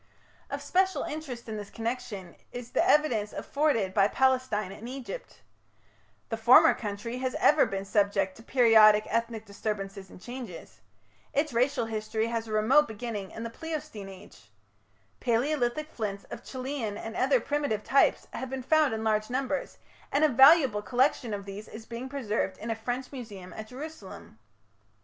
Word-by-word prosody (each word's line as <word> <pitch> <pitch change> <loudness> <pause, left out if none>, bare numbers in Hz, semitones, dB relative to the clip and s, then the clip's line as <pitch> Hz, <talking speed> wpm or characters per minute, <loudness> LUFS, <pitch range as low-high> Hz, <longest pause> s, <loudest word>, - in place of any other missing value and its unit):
Of - - -4
special 375 +1 +1
interest 285 -7 -6
in 220 -1 -4
this 205 -1 -7
connection 225 -6 -5 0.2
is 245 0 -8
the - - +2
evidence 290 - +2
afforded 280 -11 0
by 200 -1 +4
Palestine 255 -5 +1
and 225 +4 -8
Egypt. 270 - -8 0.9
The 225 - -2
former 235 +3 +7
country 215 +3 -5
has 260 0 -2
ever 300 0 +4
been 195 0 -4
subject 195 -2 +1
to - - -12
periodic 220 -4 +6
ethnic 230 -1 -1
disturbances 200 -2 -5
and - - -13
changes. 230 - -9 0.5
Its 290 -1 0
racial 245 0 +1
history 220 0 -2
has 230 -1 -2
a - - -7
remote 255 +8 +4
beginning 215 -3 -5
in 225 - -7
the 230 - -5
Pleistocene 290 -10 -6
Age. 195 +1 -14 0.7
Palaeolithic 255 +4 0
flints 200 -3 -4
of - - -7
Chellean 255 -5 -4
and 225 0 -7
other 265 0 +3
primitive 285 -5 -1
types 275 - +3
have 260 - -5
been 265 -1 -4
found 305 -2 +3
in 220 - -4
large 215 0 +1
numbers, 265 +2 -2 0.3
and 285 - +2
a 310 - +6
valuable 270 -4 +6
collection 250 0 +1
of 200 -1 -4
these 200 +2 -8
is 220 0 -10
being 240 +3 -6
preserved 215 -8 -2
in 225 +2 -4
a - - -1
French 245 +3 -4
museum 210 -9 -9
at 215 0 -8
Jerusalem. 255 - -10
230 Hz, 160 wpm, -28 LUFS, 210-265 Hz, 0.9 s, former